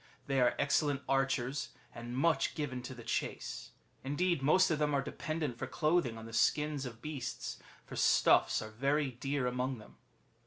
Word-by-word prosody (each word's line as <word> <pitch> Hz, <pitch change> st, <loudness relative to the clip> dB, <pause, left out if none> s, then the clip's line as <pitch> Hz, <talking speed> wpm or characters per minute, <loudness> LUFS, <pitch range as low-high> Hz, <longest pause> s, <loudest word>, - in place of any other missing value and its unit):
^ -, -, -28 dB, 0.2 s
They 135 Hz, -1 st, +1 dB
are 120 Hz, -1 st, +4 dB
excellent 140 Hz, 0 st, +1 dB
archers, 135 Hz, +1 st, 0 dB, 0.2 s
and 120 Hz, +1 st, -6 dB
much 165 Hz, +4 st, +2 dB
given 130 Hz, -5 st, -3 dB
to 130 Hz, +1 st, -7 dB
the 120 Hz, -, -10 dB
chase; -, -, -3 dB, 0.3 s
indeed, 160 Hz, +4 st, +1 dB
most 170 Hz, +6 st, +4 dB
of 155 Hz, -, +1 dB
them 150 Hz, -1 st, +2 dB
are 140 Hz, -, +2 dB
dependent 150 Hz, -3 st, -3 dB
for -, -, -3 dB
clothing 155 Hz, -8 st, +1 dB
on 110 Hz, -, -8 dB
the 115 Hz, -, -10 dB
skins 150 Hz, +3 st, +1 dB
of 115 Hz, -2 st, -11 dB
beasts, 150 Hz, -4 st, -5 dB, 0.3 s
for -, -, -9 dB
stuffs -, -, +4 dB
are 110 Hz, -, -8 dB
very 140 Hz, +4 st, +1 dB
dear 135 Hz, +2 st, -2 dB
among 125 Hz, +1 st, -1 dB
them. 105 Hz, -, -15 dB
135 Hz, 180 wpm, -33 LUFS, 125-150 Hz, 0.3 s, are